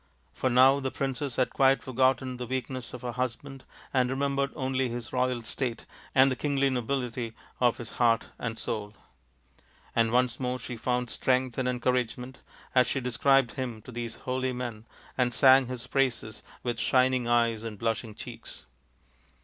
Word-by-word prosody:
For 130 - 0
now 130 +3 +6
the 135 -1 -2
princess 135 0 -3
had 130 - +1
quite 135 0 +3
forgotten 130 0 +1
the 125 -1 -5
weakness 130 0 -4
of 125 - -10
her 120 - -2
husband 130 +2 -4 0.3
and 130 -2 +3
re 130 - -1
membered 140 0 0
only 130 -1 0
his 120 0 -6
royal 125 -2 0
state 120 +1 -3 0.3
and 135 0 +6
the - - 0
kingly 140 +1 +1
nobility 125 -2 -2 0.2
of 120 -2 +3
his 115 -2 -6
heart 115 -2 +2
and 115 -2 -3
soul; 105 -1 -4 1.0
and 115 -1 +3
once 125 0 +2
more 125 -1 -1
she 125 0 -6
found 125 +1 -1
strength 130 -1 +1
and 125 -1 +1
encouragement 125 +1 -1 0.3
as 125 -1 +5
she 135 - 0
described 135 +1 +3
him 125 -4 -4
to - - -10
these 120 -1 -4
holy 130 0 -1
men 120 -3 -5 0.3
and 125 -2 +2
sang 130 0 +6
his 125 -1 -6
praises 125 -4 -1 0.2
with 120 -1 -2
shining 130 -1 +3
eyes 115 -2 +2
and 110 -2 -6
blushing 115 0 -2
cheeks. - - -9
125 Hz, 165 wpm, -28 LUFS, 120-130 Hz, 1.0 s, now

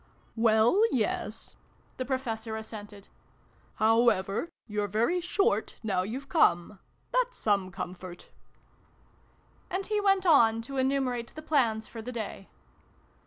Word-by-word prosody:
" - - -35
Well, 220 - +4
yes," 220 -2 -2 0.4
the 255 - -3
Professor 230 -4 -3
assented. 210 -2 -9 0.3
" - - -34
How 225 +2 +4
ever, 200 - -1 0.2
you're 210 -1 -2
very 235 - +1
short 390 +6 0
now 195 -4 +1
you're 220 +8 -4
come: 195 - +2 0.3
that's - - 0
some 200 -3 +1
comfort." 180 -1 -8 1.4
And 380 +1 -2
he 425 -1 0
went 390 -2 +3
on 230 -9 +5
to 275 +3 -6
enumerate 260 -3 0
the 310 - -8
plans 235 -8 +1
for 230 - -8
the 245 +3 -6
day. 215 -4 -6
225 Hz, 130 wpm, -29 LUFS, 210-275 Hz, 1.4 s, on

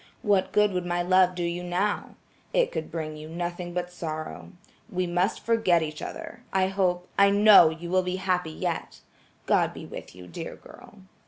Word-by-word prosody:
What 200 -4 +2
good 210 -1 +3
would 180 -1 -2
my 175 0 -1
love 185 0 +4
do 175 - -2
you 170 +1 -2
now. 180 +4 -1 0.4
It - - +2
could - - -4
bring 155 -2 -5
you 155 +1 -9
nothing 175 +1 -4
but 180 0 -3
sorrow. 155 -3 -6 0.4
We 185 0 -1
must 180 +3 -1
forget 205 -8 +3
each 155 -1 -6
other. 325 -5 -7
I 190 0 +2
hope–I 190 +1 +2
know 200 -4 +8
you 170 +2 -7
will 185 0 +4
be 180 0 -2
happy 185 -3 -1
yet. 170 +1 -4 0.4
God - - +2
be - - -8
with - - -9
you, 90 0 -11
dear 85 - -7
girl." - - -15
180 Hz, 180 wpm, -26 LUFS, 170-190 Hz, 0.4 s, know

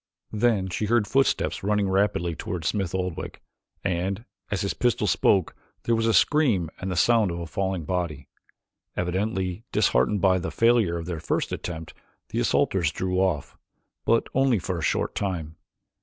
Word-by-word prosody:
Then 105 -3 +2
she 95 +3 -2
heard 115 0 +2
footsteps 135 +6 +1
running 105 0 +1
rapidly 95 -3 +1
toward 85 0 -5
Smith 95 -1 -1
Oldwick 90 -2 -4 0.4
and, 95 +4 -1 0.2
as 100 -2 -1
his 100 - -1
pistol 120 -1 +1
spoke, 95 -5 +2 0.3
there 115 - +1
was 115 0 +1
a 115 - +3
scream 110 - +3
and 95 - -4
the 90 - -2
sound 115 +2 +4
of 85 - -3
a 85 - -4
falling 95 +1 -2
body. 85 -6 -3 0.7
Evidently 95 +1 -1
disheartened 65 +12 +2
by 95 -1 +3
the - - -3
failure 115 -7 +3
of 85 - -5
their 85 -2 -4
first - - -1
attempt 80 -2 -5 0.4
the - - -2
assaulters 85 -6 +2
drew 90 +2 -1
off, 90 -7 -1 0.4
but 115 - +3
only 135 -3 +3
for 90 -1 -3
a - - -5
short - - 0
time. 85 -6 -3
95 Hz, 165 wpm, -25 LUFS, 85-105 Hz, 0.7 s, sound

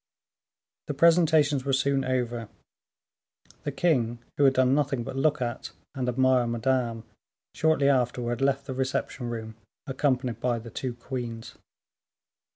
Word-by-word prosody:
The 145 - -3
presentations 160 -3 +4
were 135 0 -1
soon 135 0 +2
over. 120 -3 -2 1.2
The - - -1
king, 120 -9 +1 0.2
who 145 - +3
had 135 -1 +4
done 130 0 +4
nothing 140 -4 0
but 130 - -6
look 145 0 +1
at 120 +1 -5 0.2
and 130 -3 -2
admire 130 0 +3
Madame, 120 -1 -1 0.5
shortly 155 -3 +2
afterwards 125 -2 0
left 135 0 +1
the 130 - -5
reception 130 -1 -2
room, 110 -1 -6 0.3
accompanied 130 -3 -1
by 120 -2 0
the 115 0 -9
two 125 +1 -4
queens. 120 -2 -6
130 Hz, 135 wpm, -27 LUFS, 120-140 Hz, 1.2 s, presentations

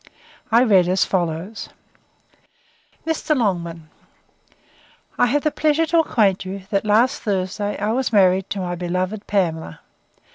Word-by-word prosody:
I 235 +2 +5
read 195 -7 +4
as 185 +1 +2
follows: 175 +3 -3 1.4
'Mr. 320 -1 0
LONGMAN, 170 -8 -2 1.3
'I - - +5
have 290 +4 0
the 305 - +1
pleasure 310 +2 +1
to 330 +1 +2
acquaint 205 - +2
you, 190 +1 -7
that 200 0 0
last 235 +7 +2
Thursday 205 0 -2
I 210 +2 -1
was 255 +2 -1
married 190 -2 +3
to 200 - -3
my 175 -1 -3
beloved 185 +4 -3
Pamela. 165 - -2
200 Hz, 135 wpm, -21 LUFS, 185-235 Hz, 1.4 s, I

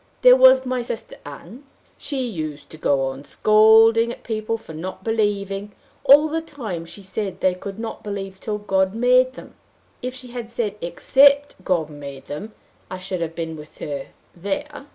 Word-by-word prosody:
There - - +9
was 260 - +6
my 255 -1 -1
sister 235 -1 -6
Ann: 170 - -11 0.3
she 270 -3 -3
used 155 -8 -6
to 155 - -8
go 140 -3 +1
on 135 +1 -8
scolding 220 +5 +5
at - - -10
people 220 0 -2
for 165 - -12
not 185 +4 -7
believing, 205 -2 -1 0.3
all 285 +3 +7
the 325 +1 -2
time 220 - -6
she 200 +4 -12
said 190 0 -4
they 185 - +2
could 195 +2 -8
not 225 0 -6
believe 195 -2 -6
till 210 0 -3
God 190 -1 0
made 250 +2 +4
them - - -12 0.5
if 255 0 -4
she 255 -1 -11
had 240 -2 -6
said 235 -4 -2
except 275 +8 +3
God 165 -5 0
made 140 -2 -9
them, 205 +10 -7 0.4
I 185 - -5
should 185 -1 -4
have 165 0 -3
been 165 -1 -4
with 150 0 -13
her 140 -2 -5 0.3
there! 200 - -5
205 Hz, 175 wpm, -22 LUFS, 175-245 Hz, 0.5 s, There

